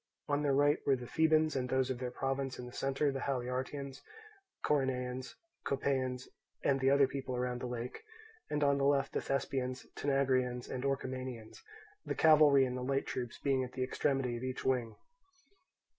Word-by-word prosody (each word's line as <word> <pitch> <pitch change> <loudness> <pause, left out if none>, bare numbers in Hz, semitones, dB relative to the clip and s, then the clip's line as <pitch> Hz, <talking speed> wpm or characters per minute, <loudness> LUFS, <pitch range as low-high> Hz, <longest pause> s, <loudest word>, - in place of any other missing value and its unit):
On 145 0 +2
their 140 -2 +2
right 145 +2 +4
were 135 - +3
the 125 -1 -7
Thebans 155 +2 +3
and 125 -1 -1
those 130 0 +1
of 125 - -4
their 125 -1 -2
province, 135 +1 -2
in 125 - -7
the 125 - -10
centre 135 +2 0
the 135 - -3
Haliartians, 130 +1 -3 0.6
Coronaeans, 130 -3 -1 0.3
Copaeans, 130 -2 -1 0.4
and 135 -1 +2
the 135 0 +3
other 140 0 +5
people 130 -1 -4
around 125 0 -2
the 125 - -3
lake, 120 0 -5 0.5
and 150 0 0
on 140 0 +3
the - - +1
left 140 -1 +2
the - - 0
Thespians, 130 -1 -2
Tanagraeans, 130 -3 +1
and 125 - -4
Orchomenians, 130 -4 -4 0.4
the - - -3
cavalry 150 -3 +6
and 125 -1 -3
the 125 - -4
light 135 +2 0
troops 120 -2 -4
being 135 -2 +1
at 125 - -7
the 130 0 -1
extremity 135 -1 0
of 120 - -7
each 130 0 -4
wing. 125 -4 0
130 Hz, 175 wpm, -33 LUFS, 125-140 Hz, 0.6 s, cavalry